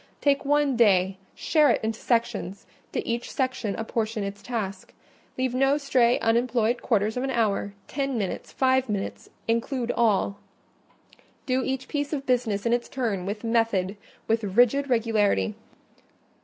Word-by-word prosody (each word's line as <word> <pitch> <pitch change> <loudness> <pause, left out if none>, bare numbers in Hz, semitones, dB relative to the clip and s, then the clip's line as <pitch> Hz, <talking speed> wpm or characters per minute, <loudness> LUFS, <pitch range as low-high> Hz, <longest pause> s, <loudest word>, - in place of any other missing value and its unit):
Take 280 -1 +2
one 290 -1 +2
day; 190 -4 +3 0.2
share 305 -3 +3
it - - +1
into 220 0 -2
sections; 230 -5 -1 0.3
to - - -3
each 235 +1 -2
section 255 -6 -1
apportion 225 -1 -2
its 200 0 -5
task: 200 -6 -5 0.4
leave 255 -1 0
no 270 +2 +3
stray 255 -4 +3
unemployed 235 0 +1
quarters 215 0 +1
of 250 - -1
an 270 - -1
hour, 210 -4 0
ten 275 -2 -2
minutes, 200 -4 -3
five 260 -1 +2
minutes—include 230 +4 -2
all; 205 -3 +1 1.1
do 260 0 +1
each 265 0 -3
piece 290 0 -2
of 275 -2 -3
business 235 -6 0
in 235 - +2
its 240 0 -1
turn 215 -8 -2
with 210 +2 -4
method, 225 -4 +1 0.3
with 225 0 +1
rigid 245 +7 +3
regularity. 220 - +2
235 Hz, 140 wpm, -26 LUFS, 210-260 Hz, 1.1 s, day